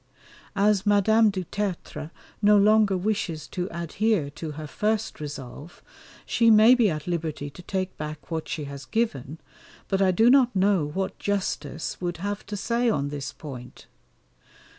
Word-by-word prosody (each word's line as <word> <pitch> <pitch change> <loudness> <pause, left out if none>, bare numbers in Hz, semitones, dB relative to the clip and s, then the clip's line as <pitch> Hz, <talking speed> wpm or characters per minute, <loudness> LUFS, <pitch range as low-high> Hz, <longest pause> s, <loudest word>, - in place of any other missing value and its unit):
As 200 -1 +3
Madame 215 +2 +4
du 190 -2 -3
Tertre 175 -5 -4 0.3
no 210 0 +6
longer 210 -1 +4
wishes 180 -6 -2
to 180 0 -3
adhere 170 -1 -1
to 155 +1 -6
her 155 +1 -7
first 210 +7 -2
resolve, 145 +1 -8 0.4
she 230 -1 +3
may 220 +2 +8
be 240 -5 +4
at 155 -3 -4
liberty 160 -4 -3
to 180 - -12
take 185 +1 -3
back 150 +1 -7
what 160 -1 -3
she 155 - -3
has 140 -1 -8
given, 160 - -2 0.5
but 195 -1 0
I 190 - +4
do 225 +7 +5
not 255 -4 +4
know 190 -5 +2
what 190 +6 -4
justice 185 -7 -3
would 175 -1 -2
have 205 +3 -4
to 205 0 -4
say 235 +4 +1
on 145 -9 0
this 140 -2 -5
point. 125 -5 -10
185 Hz, 160 wpm, -25 LUFS, 155-210 Hz, 0.5 s, may